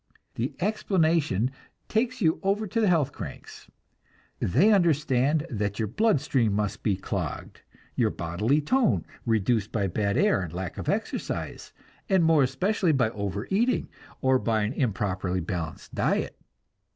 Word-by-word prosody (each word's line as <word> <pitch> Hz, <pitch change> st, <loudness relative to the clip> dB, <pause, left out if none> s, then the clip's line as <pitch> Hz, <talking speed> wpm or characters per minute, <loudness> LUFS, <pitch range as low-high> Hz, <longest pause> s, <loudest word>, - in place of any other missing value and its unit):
The 120 Hz, +4 st, -3 dB
explanation 165 Hz, -, +1 dB, 0.4 s
takes 245 Hz, +2 st, 0 dB
you 160 Hz, -3 st, +2 dB
over 200 Hz, +3 st, 0 dB
to 225 Hz, +3 st, -1 dB
the 215 Hz, -, +3 dB
"health 155 Hz, -6 st, +2 dB
cranks." -, -, -9 dB, 0.7 s
They 175 Hz, -, +4 dB
understand 150 Hz, -4 st, +2 dB
that 105 Hz, -3 st, -2 dB
your 110 Hz, -, -1 dB
blood 210 Hz, -, +2 dB
stream 130 Hz, -7 st, +1 dB
must 105 Hz, 0 st, -1 dB
be 100 Hz, -, +1 dB
clogged, 95 Hz, -, -5 dB, 0.3 s
your 115 Hz, -3 st, +2 dB
bodily 105 Hz, -, 0 dB
tone 250 Hz, -, +2 dB, 0.2 s
reduced 110 Hz, -1 st, +1 dB
by 100 Hz, -3 st, 0 dB
bad 100 Hz, +2 st, 0 dB
air 100 Hz, -, +3 dB
and 85 Hz, -4 st, -5 dB
lack 90 Hz, 0 st, -5 dB
of -, -, -3 dB
exercise, -, -, -3 dB, 0.4 s
and 190 Hz, -3 st, +4 dB
more 160 Hz, -2 st, +5 dB
especially 170 Hz, +7 st, +1 dB
by 120 Hz, -5 st, +2 dB
over 100 Hz, 0 st, -4 dB
eating, 235 Hz, +6 st, +1 dB, 0.3 s
or 130 Hz, 0 st, +3 dB
by 110 Hz, -3 st, +1 dB
an 105 Hz, +4 st, -1 dB
improperly 95 Hz, -7 st, -1 dB
balanced 85 Hz, -2 st, -5 dB
diet. -, -, 0 dB
130 Hz, 145 wpm, -27 LUFS, 100-170 Hz, 0.7 s, more